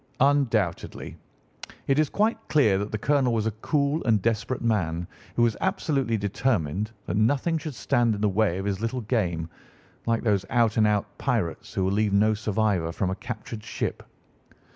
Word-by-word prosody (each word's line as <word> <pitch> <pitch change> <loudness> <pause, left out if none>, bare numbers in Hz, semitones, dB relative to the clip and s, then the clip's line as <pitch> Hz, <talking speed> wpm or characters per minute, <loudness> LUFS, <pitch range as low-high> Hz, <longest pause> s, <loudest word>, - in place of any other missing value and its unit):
"Undoubtedly. 115 -11 +1 0.7
It 135 +2 +2
is 155 -2 +2
quite 220 +2 +1
clear 110 -11 +3
that 105 +1 -4
the 110 - -1
colonel 130 +1 +2
was 110 -1 0
a 110 - +1
cool 145 +1 +1
and 110 -4 +4
desperate 115 +4 -1
man, 90 -7 0 0.3
who 120 - +3
was 115 -2 +2
absolutely 145 - 0
determined 100 - -1 0.2
that - - -3
nothing 145 +9 +2
should 155 -3 -6
stand 115 +2 +1
in 100 - -6
the 105 - +3
way 100 -2 +1
of 95 - -4
his 100 0 -2
little 115 +2 -2
game, 90 -8 -1 0.6
like 115 -1 +1
those 105 -4 +2
out 115 -3 +2
and 110 -1 +5
out 105 -1 +1
pirates 115 - -1
who 95 - +1
will 95 - +1
leave 105 0 +1
no 105 +2 +4
survivor 105 -5 0
from 90 +2 -1
a - - -2
captured 110 -1 -7
ship. 115 - -3
110 Hz, 180 wpm, -26 LUFS, 100-125 Hz, 0.7 s, and